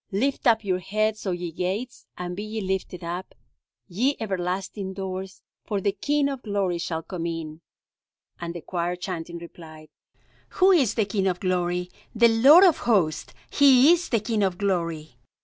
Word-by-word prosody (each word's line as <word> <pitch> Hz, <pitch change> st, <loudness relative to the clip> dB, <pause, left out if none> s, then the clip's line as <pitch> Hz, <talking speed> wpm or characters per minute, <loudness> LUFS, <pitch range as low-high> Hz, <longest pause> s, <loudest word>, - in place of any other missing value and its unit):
Lift 260 Hz, +8 st, 0 dB
up 225 Hz, -1 st, +4 dB
your 185 Hz, -2 st, 0 dB
heads, 215 Hz, +3 st, -1 dB
O -, -, +1 dB
ye 175 Hz, -1 st, -4 dB
gates, 195 Hz, +9 st, -4 dB
and 180 Hz, 0 st, -5 dB
be 200 Hz, -, -5 dB
ye 215 Hz, +1 st, -5 dB
lifted 190 Hz, -2 st, -3 dB
up, 175 Hz, +2 st, -6 dB, 0.5 s
ye 245 Hz, +10 st, 0 dB
everlasting 190 Hz, -1 st, -3 dB
doors, 190 Hz, 0 st, -6 dB, 0.2 s
for 205 Hz, -2 st, -2 dB
the 200 Hz, +1 st, 0 dB
King 285 Hz, +8 st, 0 dB
of 275 Hz, -2 st, -4 dB
glory 200 Hz, -5 st, -1 dB
shall 165 Hz, -1 st, -3 dB
come 170 Hz, -2 st, -5 dB
in.'" 165 Hz, -1 st, -6 dB, 0.8 s
And 170 Hz, 0 st, -5 dB
the 170 Hz, -, -6 dB
choir 175 Hz, +1 st, -2 dB
chanting, 175 Hz, -2 st, -6 dB
replied: 160 Hz, -2 st, -12 dB, 0.7 s
"Who 380 Hz, +1 st, +6 dB
is 275 Hz, -, +3 dB
the 220 Hz, -, +1 dB
King 195 Hz, -1 st, -1 dB
of 180 Hz, -1 st, -1 dB
glory? 180 Hz, -1 st, -1 dB, 0.2 s
The 235 Hz, +1 st, +6 dB
Lord 270 Hz, +11 st, +7 dB
of 355 Hz, -6 st, +5 dB
hosts 175 Hz, -9 st, +1 dB, 0.2 s
He 275 Hz, +1 st, +6 dB
is 350 Hz, 0 st, -2 dB
the 230 Hz, -, +2 dB
King 220 Hz, -1 st, -1 dB
of 190 Hz, -3 st, 0 dB
glory." 170 Hz, -8 st, -2 dB
190 Hz, 170 wpm, -25 LUFS, 175-220 Hz, 0.8 s, Lord